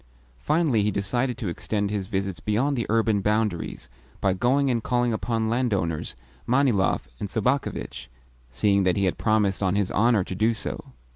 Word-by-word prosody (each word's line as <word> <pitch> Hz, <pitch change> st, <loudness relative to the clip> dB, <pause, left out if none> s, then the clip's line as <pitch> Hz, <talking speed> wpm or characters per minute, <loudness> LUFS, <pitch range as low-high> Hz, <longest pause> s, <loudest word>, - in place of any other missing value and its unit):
Finally 150 Hz, -, +2 dB
he 105 Hz, -, +1 dB
decided 120 Hz, +5 st, -1 dB
to 110 Hz, -, -4 dB
extend 100 Hz, +4 st, -2 dB
his 100 Hz, -3 st, -2 dB
visits 95 Hz, -4 st, -2 dB
beyond 120 Hz, -, 0 dB
the 120 Hz, -4 st, -2 dB
urban 110 Hz, -2 st, +2 dB
boundaries 105 Hz, -3 st, -1 dB, 0.3 s
by 95 Hz, -, +2 dB
going 130 Hz, +7 st, +2 dB
and 115 Hz, -2 st, 0 dB
calling 120 Hz, 0 st, +1 dB
upon 110 Hz, +2 st, -1 dB
landowners 105 Hz, -10 st, -1 dB, 0.3 s
Manilov 125 Hz, -6 st, +2 dB
and 100 Hz, -, -4 dB
Sobakevitch, 110 Hz, -, -2 dB, 0.4 s
seeing 100 Hz, +10 st, +2 dB
that 95 Hz, 0 st, +2 dB
he 100 Hz, -, +2 dB
had 90 Hz, -, -1 dB
promised 105 Hz, -3 st, +1 dB
on 95 Hz, -1 st, +1 dB
his 100 Hz, -2 st, 0 dB
honour 110 Hz, -1 st, +3 dB
to 95 Hz, -, -6 dB
do 110 Hz, +5 st, +1 dB
so. -, -, -6 dB
105 Hz, 165 wpm, -25 LUFS, 95-120 Hz, 0.4 s, honour